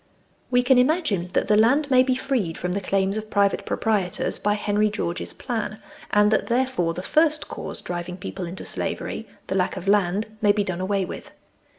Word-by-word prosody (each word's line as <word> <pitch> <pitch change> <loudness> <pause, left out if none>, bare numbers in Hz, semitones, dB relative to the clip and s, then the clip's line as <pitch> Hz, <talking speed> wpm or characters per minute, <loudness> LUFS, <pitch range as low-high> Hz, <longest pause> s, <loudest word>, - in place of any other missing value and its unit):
We 245 0 +3
can 250 0 +5
imagine 250 - +1
that - - +1
the 210 - +4
land 270 +7 +3
may 255 -1 +7
be 255 0 +2
freed 245 -11 -1
from 180 - -2
the 200 +2 -1
claims 195 +1 0
of 215 0 -5
private 200 -1 +1
proprietors, 205 -6 -1
by 205 0 +1
Henry 210 0 +1
George's 180 -4 -3
plan, 225 -4 -4 0.3
and 210 0 +4
that, - - +1
therefore, 240 -9 0
the 180 - -5
first 310 +3 +2
cause - - -6
driving 175 0 -5
people 180 -1 -6
into 180 +2 -7
slavery - - -3 0.2
the - - -3
lack 190 +1 0
of 185 +1 -7
land 205 +2 +1
may 205 -2 +5
be 205 0 +1
done 185 -2 -3
away 195 0 0
with. - - -9
205 Hz, 195 wpm, -24 LUFS, 185-245 Hz, 0.3 s, may